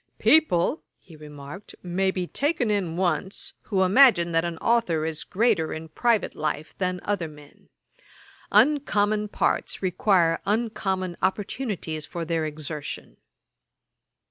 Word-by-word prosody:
'People 310 - +3 0.2
(he 165 - -17
remarked) 150 +4 -11
may 185 +2 0
be 185 -1 -2
taken 270 - -1
in 180 -5 -1
once, 180 +1 -2
who 190 -3 +1
imagine 185 -4 +5
that 165 0 +2
an 170 -1 -3
authour 180 -10 +1
is 160 -1 -3
greater 205 -6 +1
in 160 0 -6
private 230 +5 +1
life 155 0 -4
than 185 -1 -1
other 200 -5 -1
men. 150 -1 -16 0.8
Uncommon 210 -4 +3
parts 205 - -1
require 180 -2 +2
uncommon 195 -4 -1
opportunities 190 - -2
for 170 +2 -5
their 165 -1 -1
exertion. 150 -1 -7
185 Hz, 120 wpm, -25 LUFS, 160-210 Hz, 0.8 s, imagine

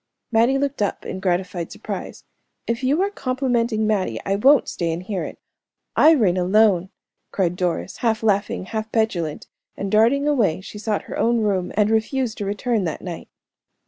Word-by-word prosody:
Mattie 235 +4 +3
looked 280 -3 -2
up 205 - -1
in 190 - -5
gratified 180 -2 -2
surprise. - - -7 0.4
"If 235 +2 -2
you 290 +8 +2
are 400 - -1
complimenting 245 - 0
Mattie, 190 - 0
I 195 - +1
won't 270 +6 +5
stay 170 -2 -2
and 165 +2 -4
hear 190 -1 -3
it; - - -7 0.6
I 315 +2 +7
reign 200 - +2
alone!" 190 0 +3 0.4
cried 180 -3 0
Doris, 175 - -2
half 225 -2 0
laughing, 200 -3 0
half 220 +2 -4
petulant, 180 -9 -1 0.3
and 195 -1 -3
darting 235 +7 +3
away 225 - +2
she 205 +2 -9
sought 215 -1 -1
her - - -6
own 230 +1 +2
room, 195 -4 0
and 210 0 +3
refused 225 +2 0
to 205 - -2
return 210 +2 -1
that 160 - -4
night. 175 -3 -7
215 Hz, 175 wpm, -22 LUFS, 185-235 Hz, 0.6 s, I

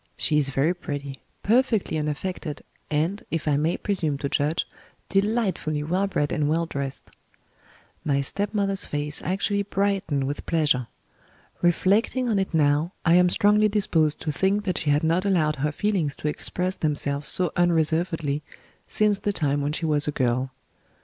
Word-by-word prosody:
She 150 -1 +2
is 140 -2 +1
very 140 +6 +1
pretty, 145 -5 -6 0.2
perfectly 230 -4 +2
unaffected, 150 +1 -3 0.3
and, 160 +7 0
if 165 -1 -3
I 145 - +3
may 155 +4 +1
presume 165 -8 -1
to 140 0 -3
judge, 150 +4 0 0.4
delightfully 195 -7 0
well 185 +6 0
bred 145 -6 -1
and 150 -2 0
well 165 +2 +1
dressed." 140 -4 -6 0.9
My 140 -2 +1
stepmother's 200 +5 -1
face 145 0 -2
actually 200 +3 0
brightened 195 -8 0
with 140 +2 -4
pleasure. 150 -7 +1 0.7
Reflecting 205 +8 +2
on 210 -3 +2
it 190 - -1
now, 155 +2 +2
I 165 - +5
am 180 0 +5
strongly 210 +3 +4
disposed 165 -7 +1
to 155 - -2
think 195 +7 +1
that 185 -3 -1
she 155 - -2
had 145 +2 +3
not 165 +3 +2
allowed 160 -6 +1
her 150 +2 0
feelings 175 -5 -1
to - - -4
express 180 +4 -2
themselves 145 -1 -1
so 180 -4 +4
unreservedly, 165 -3 +1 0.5
since 210 -2 +2
the 205 - -1
time 145 -6 0
when 145 +1 -1
she 160 - -3
was 150 -2 +1
a - - +1
girl. 130 -1 0
160 Hz, 160 wpm, -25 LUFS, 145-195 Hz, 0.9 s, I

